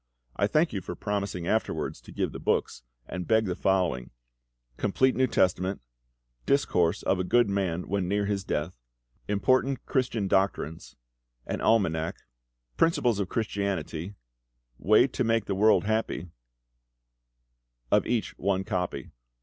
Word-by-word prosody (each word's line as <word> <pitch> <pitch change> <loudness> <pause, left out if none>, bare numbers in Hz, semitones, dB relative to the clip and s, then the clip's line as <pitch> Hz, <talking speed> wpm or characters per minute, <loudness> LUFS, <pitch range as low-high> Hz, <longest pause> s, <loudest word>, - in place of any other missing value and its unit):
I 100 - +2
thank 155 +10 +2
you 95 - -2
for 90 - -6
promising 100 -3 -3
afterwards 110 +5 -1
to - - -13
give - - -2
the - - -7
books, - - -1 0.2
and 90 -1 -6
beg 110 -1 +3
the 90 -2 -2
following: 90 -12 0 0.7
Complete 130 - +2
New 130 0 +3
Testament, 95 -2 +1 0.7
'Discourse 90 -12 +2
of 95 - +1
a - - +1
Good 120 +5 +3
Man 90 -3 -1
when 95 -2 -1
near 100 +2 0
his 100 -1 -1
Death,' 75 -8 -3 0.5
'Important 130 +6 +1
Christian 120 -6 0
Doctrines,' 95 -5 -1 0.5
an - - -3
Almanack, 85 -8 +2 0.6
'Principles 125 -10 +2
of 95 -3 -2
Christianity,' 100 -4 -3 0.6
'Way 105 +5 +5
to 130 -1 -2
make 115 -2 +1
the 100 - -2
World 105 +3 +4
happy,' 105 -6 -2 1.6
of - - +3
each 115 -2 -1
one 95 0 0
copy. 90 -1 -3
100 Hz, 135 wpm, -27 LUFS, 90-110 Hz, 1.6 s, Way